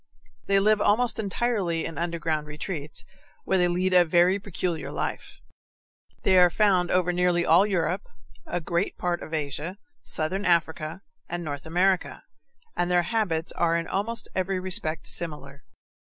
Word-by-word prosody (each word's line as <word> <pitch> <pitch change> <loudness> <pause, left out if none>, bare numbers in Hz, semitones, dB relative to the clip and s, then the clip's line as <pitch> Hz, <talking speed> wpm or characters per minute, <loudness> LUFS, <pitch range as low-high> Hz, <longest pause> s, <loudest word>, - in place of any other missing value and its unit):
They 195 0 +4
live 210 +1 +3
almost 230 +3 +2
entirely 200 -5 -1
in 165 - -5
underground 165 -3 -2
retreats, 150 0 -5 0.4
where 190 - +1
they 180 - +4
lead 180 +2 0
a 180 -1 +7
very 175 +3 +3
peculiar 180 -5 -3
life. - - -4 0.9
They 185 -1 +5
are 180 0 +7
found 185 -1 +2
over 180 -1 +2
nearly 175 -1 +2
all 180 +5 +5
Europe, 190 - -1 0.4
a 175 - -2
great 170 +3 -1
part 175 -1 -1
of - - -8
Asia, 155 +4 -3 0.2
southern 185 +6 -2
Africa, 165 0 0 0.3
and 175 0 -3
North 145 -1 -5
America, 180 +3 +1 0.5
and 175 - 0
their 175 -1 +3
habits 175 -5 -1
are 165 -1 +1
in 170 0 -1
almost 225 +4 -2
every 190 0 -1
respect 170 -4 -1
similar. 150 -4 -5
175 Hz, 150 wpm, -26 LUFS, 165-190 Hz, 0.9 s, a